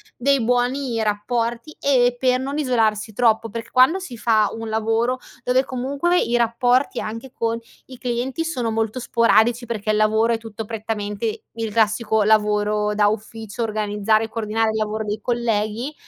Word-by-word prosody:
dei 275 +1 +2
buoni 245 +1 0
rapporti 230 +6 -2
e 250 -3 +3
per 255 0 +2
non 275 +2 -3
isolarsi 225 -6 +1
troppo; 225 0 +2
perché 230 +2 -7
quando 265 +9 +5
si 270 -10 -8
fa 220 -2 +3
un 225 0 -6
lavoro 225 +3 0 0.2
dove 255 +2 +2
comunque 280 +8 0
i 240 0 +1
rapporti, 245 +3 +1
anche 230 +4 -6
con 230 0 -1 0.3
i 260 - -11
clienti, 250 +6 -2
sono 245 -8 -2
molto 225 +2 -1
sporadici 235 0 +3
perché 215 -2 -4
il 215 - +1
lavoro 220 +2 +3
è - - 0
tutto 225 -1 -8
prettamente 215 0 -4
il 225 -2 -4
classico 220 -1 +2
lavoro 210 0 +2
da 210 -1 +4
ufficio, 220 +1 -5
organizzare 215 0 +1
e - - -10
coordinare, 220 0 -1
il 220 - -3
lavoro 215 0 -2
dei 210 +1 -3
colleghi, 235 +3 -1
230 Hz, 160 wpm, -22 LUFS, 215-245 Hz, 0.3 s, quando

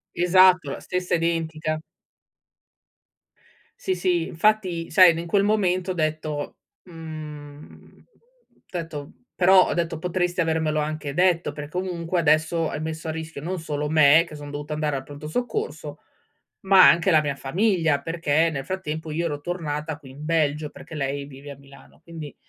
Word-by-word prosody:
Esatto, 180 -3 +5
la - - -5
stessa 180 -1 -1
identica. 160 -2 -1 2.0
Sì, 380 -7 -1
sì, 175 -2 0
infatti 185 -2 0
sai, 185 -4 +7
n 165 - -4
in 170 - -6
quel 200 +3 +2
momento 190 -3 +1
ho - - -1
detto: 155 -3 -3 0.3
“Mhmm”, 155 -3 -11 0.7
detto 165 -5 -6 0.2
però 185 0 +6
ho - - 0
detto: 170 -1 -2
“Potresti 180 +1 -1
avermelo 160 -2 0
anche 150 -1 -3
detto 175 -3 +2
per 145 0 -7
comunque 180 0 -2
adesso 155 +1 +2
hai - - -4
messo 160 +1 -5
a - - -1
rischio 160 -2 -7
non 180 +3 -4
solo 150 -2 -3
me, 155 +1 +6
che 155 - -10
sono 145 -1 -9
dovuta 145 +1 -5
andare 150 -2 -1
al 135 - -6
Pronto 145 +2 -9
Soccorso, 250 - -4 0.6
ma 195 -2 +7
anche 170 +2 +4
la 155 -2 +5
mia 145 -2 -2
famiglia.” 165 0 +1
Perché 165 0 +1
nel 135 -3 -5
frattempo 160 -4 -4
io 165 +3 -1
ero 145 -3 -3
tornata 155 -2 -4
qui 135 -4 -14
in 145 +3 -10
Belgio, 155 -2 0
perché - - -13
lei 140 0 -3
vive 140 +1 -11
a 140 - -10
Milano. 140 0 -18
Quindi, 160 -4 -9
160 Hz, 160 wpm, -24 LUFS, 150-175 Hz, 2.0 s, sai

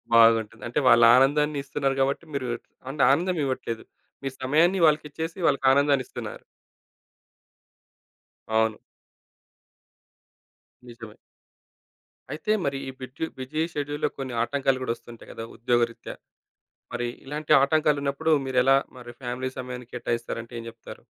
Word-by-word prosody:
బాగుంటుంది. 115 -1 +4
అంటే 120 - 0
వాళ్ళు 115 -1 +7
ఆనందాన్ని 145 +3 +3
ఇస్తున్నారు 140 -1 -1
గాబట్టి, 140 +5 0
మీరు 130 -2 -2 0.4
అండ్ 140 0 0
ఆనందం 175 +4 +1
ఇవ్వట్లేదు. 115 -4 -3 0.4
మీరు 135 -1 -4
సమయాన్ని 165 +8 +3
వాళ్ళకి 150 0 +2
ఇచ్చేసి, 160 +4 -5
వాళ్ళకి 140 -1 +1
ఆనందాన్ని 140 -2 +3
ఇస్తున్నారు. - - -7 2.0
అవును. 110 -1 +1 2.1
నిజమే. 115 -3 -11 1.2
అయితే 160 +8 -2
మరి 140 -1 -1
ఈ - - -3
బిట్యు 130 +5 -5
బిజీ 140 +5 -3
షెడ్యూల్లో 145 0 -2
కొన్ని 135 -2 -5
ఆటంకాలు 135 0 0
గూడా 115 -2 -1
ఒస్తుంటాయి 120 -1 -14
కదా 115 - -7
ఉద్యోగరీత్యా, 120 0 -1 0.8
మరి 120 0 -1 0.2
ఇలాంటి 150 +2 -2
ఆటంకాలున్నప్పుడు, 150 0 +1
మీరు 130 -1 +2
ఎలా 135 +1 +6 0.2
మరి 120 -1 -10
ఫ్యామిలీ 125 +1 -3
సమయాని 125 -1 -6
కేటాయిస్తారంటే 120 -1 -4
ఏం 115 - -7
జెప్తారు? 115 0 -11
130 Hz, 120 wpm, -26 LUFS, 120-145 Hz, 2.1 s, వాళ్ళు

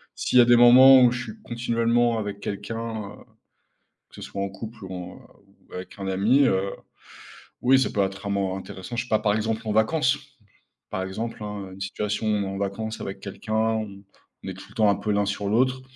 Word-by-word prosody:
s'il - - 0
y - - +10
a - - +6
des 120 0 +6
moments 130 +2 +9
où 120 - +5
je 120 0 -3
suis 110 -2 -10
continuellement 115 0 +1
avec 100 -1 -5
quelqu'un, 100 +3 -5 0.4
heu, - - -16 0.9
que - - -17
ce - - -9
soit 100 - -6
en 100 - -3
couple 110 +1 -9
ou 95 - -8
en, 90 -1 -7 0.6
heu, - - -7
avec 90 - -9
un 100 - -6
ami, 100 +9 +3
heu, 95 -2 +1 0.9
oui 130 +2 +5
ça 130 - +1
peut 100 - 0
être 95 +1 -5
amant 100 -1 -1
intéressant 95 +4 -8
je 120 - -1
sais 125 - -16
pas, 110 - +3
par 105 -1 +1
exemple, 110 +1 -2
en 105 - 0
vacances. 130 +5 +2 0.7
Par 95 - -3
exemple 110 +4 -5
hein, 100 -2 -6
une 95 - -12
situation 105 +3 -3 0.2
en 95 0 -5
vacances 105 +3 -4
avec 95 - -6
quelqu'un, 105 +2 -7
on 110 -3 -1 0.4
on - - -5
est - - -5
tout 95 - -12
le - - -18
temps 110 -2 +3
un - - +1
peu 105 - -3
l'un 100 0 +1
sur 100 0 -2
l'autre, 130 +3 +2
105 Hz, 215 wpm, -25 LUFS, 100-120 Hz, 0.9 s, y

